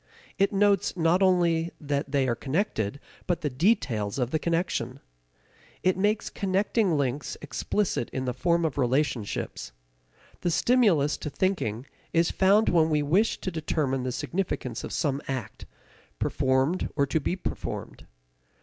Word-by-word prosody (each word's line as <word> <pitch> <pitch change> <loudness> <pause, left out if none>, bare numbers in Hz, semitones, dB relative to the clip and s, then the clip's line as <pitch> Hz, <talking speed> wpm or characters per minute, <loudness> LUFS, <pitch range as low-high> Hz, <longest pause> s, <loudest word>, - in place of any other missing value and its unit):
It 195 - +3
notes 200 0 +2
not 170 +3 +3
only 170 -3 +3
that 140 -1 -2
they 140 -2 +2
are 120 - +2
connected, 130 - -2 0.3
but 175 - 0
the 150 - -1
details 130 - +1
of 125 -2 -1
the 155 - +1
connection. 165 -7 -1 0.8
It 185 0 +3
makes 205 +3 0
connecting 195 -2 +1
links 140 +1 -2
explicit 155 - -1
in 130 0 -3
the 125 - -1
form 170 +6 +1
of 150 -3 -2
relationships. 125 - -1 0.7
The 175 - 0
stimulus 175 - +3
to 150 - -5
thinking 140 - -1 0.3
is 165 0 +3
found 200 +3 +4
when 165 -2 +4
we 150 -1 +2
wish 185 +10 +2
to 185 - -3
determine 150 -5 -1
the 130 0 -2
significance 130 -5 -3
of - - -6
some 140 -1 -1
act, 130 -3 -5 0.5
performed 130 +7 +1
or 140 -1 +3
to 150 +3 0
be 165 - -1
performed. 185 - -6
155 Hz, 145 wpm, -27 LUFS, 130-185 Hz, 0.8 s, found